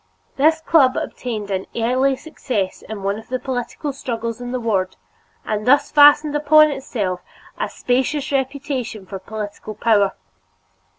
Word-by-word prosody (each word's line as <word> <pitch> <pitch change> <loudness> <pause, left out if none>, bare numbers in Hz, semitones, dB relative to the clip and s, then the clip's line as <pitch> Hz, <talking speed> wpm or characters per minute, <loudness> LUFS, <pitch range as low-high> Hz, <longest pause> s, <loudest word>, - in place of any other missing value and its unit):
This 315 +3 +3
club 295 -5 +4
obtained 215 -5 -4
an 190 0 -2
early 255 +4 +2
success 240 -10 -4
in 210 -2 -8
one 200 +2 -1
of 225 - -14
the 255 - -1
political 260 +3 -4
struggles 230 -2 -4
in 245 0 -5
the 255 - -2
ward 200 -6 -1 0.5
and 215 +1 -2
thus 285 +3 +4
fastened 295 0 +6
upon 305 +1 +5
itself 205 -10 -3 0.4
a - - -1
specious 265 +4 -1
reputation 265 -6 -2
for 195 0 -7
political 210 +1 -7
power. 205 -3 +3
245 Hz, 140 wpm, -20 LUFS, 215-280 Hz, 0.5 s, fastened